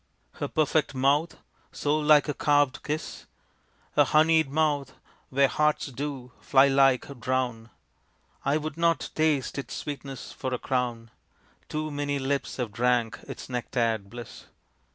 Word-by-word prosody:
"Her -, -, -4 dB
perfect 155 Hz, -2 st, +1 dB
mouth 140 Hz, +5 st, +2 dB, 0.3 s
so 150 Hz, +1 st, 0 dB
like 150 Hz, 0 st, +5 dB
a 150 Hz, -, -1 dB
carvèd 145 Hz, -3 st, +2 dB
kiss?" 150 Hz, +1 st, -5 dB, 0.6 s
"Her -, -, +5 dB
honeyed 160 Hz, -1 st, +4 dB
mouth, 145 Hz, -3 st, 0 dB, 0.4 s
where 140 Hz, +1 st, +4 dB
hearts 150 Hz, +2 st, +1 dB
do, 130 Hz, -1 st, -5 dB
fly 135 Hz, 0 st, +5 dB
like, 135 Hz, -1 st, +2 dB
drown?" 125 Hz, -3 st, -2 dB, 0.7 s
I 140 Hz, +2 st, +2 dB
would 155 Hz, 0 st, -5 dB
not 170 Hz, 0 st, +1 dB
taste 150 Hz, -3 st, +1 dB
its 140 Hz, -, -6 dB
sweetness 140 Hz, -3 st, -6 dB
for 130 Hz, -1 st, -3 dB
a -, -, -3 dB
crown; 120 Hz, -4 st, -2 dB, 0.6 s
Too 155 Hz, 0 st, -3 dB
many 145 Hz, 0 st, -2 dB
lips 140 Hz, +1 st, -2 dB
have 120 Hz, -5 st, -3 dB
drank 120 Hz, 0 st, +1 dB
its -, -, -8 dB
nectared 115 Hz, -4 st, -1 dB
bliss. 120 Hz, +1 st, -10 dB
140 Hz, 135 wpm, -27 LUFS, 125-150 Hz, 0.7 s, like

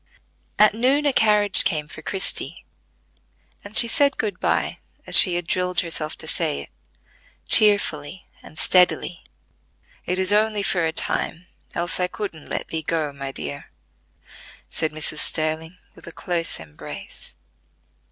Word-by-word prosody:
At 210 Hz, -1 st, +5 dB
noon 260 Hz, +6 st, +1 dB
a 285 Hz, -, +2 dB
carriage 210 Hz, -3 st, +5 dB
came 150 Hz, -4 st, -2 dB
for 160 Hz, -, -9 dB
Christie, 190 Hz, +4 st, -3 dB, 1.0 s
and 205 Hz, +2 st, -5 dB
she 235 Hz, -, +4 dB
said 280 Hz, +3 st, +2 dB
good 205 Hz, -4 st, -3 dB
by, -, -, -1 dB, 0.3 s
as -, -, +6 dB
she 180 Hz, -4 st, +9 dB
had 175 Hz, -1 st, -3 dB
drilled 180 Hz, +1 st, -1 dB
herself 160 Hz, -2 st, -3 dB
to -, -, -5 dB
say 70 Hz, -, -1 dB
it, -, -, -12 dB, 0.8 s
cheerfully 190 Hz, -6 st, +2 dB, 0.2 s
and 155 Hz, -, -15 dB
steadily. 180 Hz, -1 st, +2 dB, 0.8 s
"It 180 Hz, -, -1 dB
is 190 Hz, +1 st, +3 dB
only 210 Hz, -1 st, +2 dB
for 175 Hz, -4 st, +1 dB
a -, -, -2 dB
time, 165 Hz, +2 st, -3 dB, 0.3 s
else 175 Hz, +2 st, -1 dB
I 180 Hz, -, +1 dB
couldn't 180 Hz, -5 st, -7 dB
let -, -, -4 dB
thee 160 Hz, -, -3 dB
go, 155 Hz, -2 st, -2 dB
my 140 Hz, -1 st, -6 dB
dear," 70 Hz, -, -7 dB, 1.0 s
said 160 Hz, -, -2 dB
Mrs. 155 Hz, 0 st, -3 dB
Sterling, 160 Hz, +2 st, -2 dB, 0.2 s
with -, -, -16 dB
a -, -, -7 dB
close 170 Hz, 0 st, -3 dB
embrace. 75 Hz, -2 st, -11 dB
175 Hz, 145 wpm, -22 LUFS, 155-205 Hz, 1.0 s, she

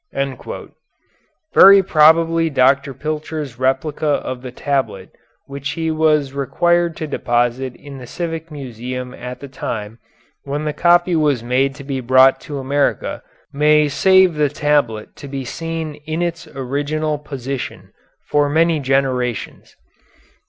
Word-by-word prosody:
Very 195 Hz, 0 st, +8 dB
probably 165 Hz, 0 st, +4 dB
Dr. 140 Hz, 0 st, +2 dB
Pilcher's 150 Hz, -2 st, -5 dB
replica 135 Hz, +4 st, 0 dB
of 130 Hz, -3 st, -1 dB
the 130 Hz, -, -7 dB
tablet 130 Hz, -8 st, -2 dB, 0.3 s
which 140 Hz, 0 st, -5 dB
he 160 Hz, -1 st, -2 dB
was 155 Hz, -3 st, +2 dB
required 170 Hz, +4 st, +1 dB
to 155 Hz, -, -4 dB
deposit 120 Hz, -2 st, -1 dB
in 140 Hz, -2 st, -11 dB
the 125 Hz, -, -10 dB
Civic 165 Hz, +1 st, -5 dB
Museum 125 Hz, -3 st, -6 dB
at 125 Hz, 0 st, -8 dB
the 140 Hz, -, -7 dB
time 115 Hz, -4 st, -6 dB, 0.4 s
when 145 Hz, +2 st, -4 dB
the 150 Hz, -, -1 dB
copy 175 Hz, +1 st, +3 dB
was 145 Hz, -7 st, +1 dB
made 130 Hz, +3 st, +1 dB
to 140 Hz, -, -10 dB
be 135 Hz, -1 st, -3 dB
brought 130 Hz, +2 st, +5 dB
to 145 Hz, -3 st, -6 dB
America 140 Hz, +1 st, -1 dB, 0.3 s
may 150 Hz, +1 st, +4 dB
save 190 Hz, +5 st, +4 dB
the 150 Hz, -1 st, +1 dB
tablet 145 Hz, -7 st, 0 dB
to 140 Hz, -, -9 dB
be 135 Hz, -1 st, -5 dB
seen 165 Hz, +2 st, -4 dB, 0.2 s
in 160 Hz, +2 st, -1 dB
its 170 Hz, -1 st, -4 dB
original 145 Hz, +2 st, -2 dB
position 135 Hz, -2 st, -6 dB, 0.3 s
for 145 Hz, -1 st, +2 dB
many 165 Hz, +1 st, +2 dB
generations. 130 Hz, -4 st, -2 dB
145 Hz, 130 wpm, -19 LUFS, 130-155 Hz, 0.4 s, Very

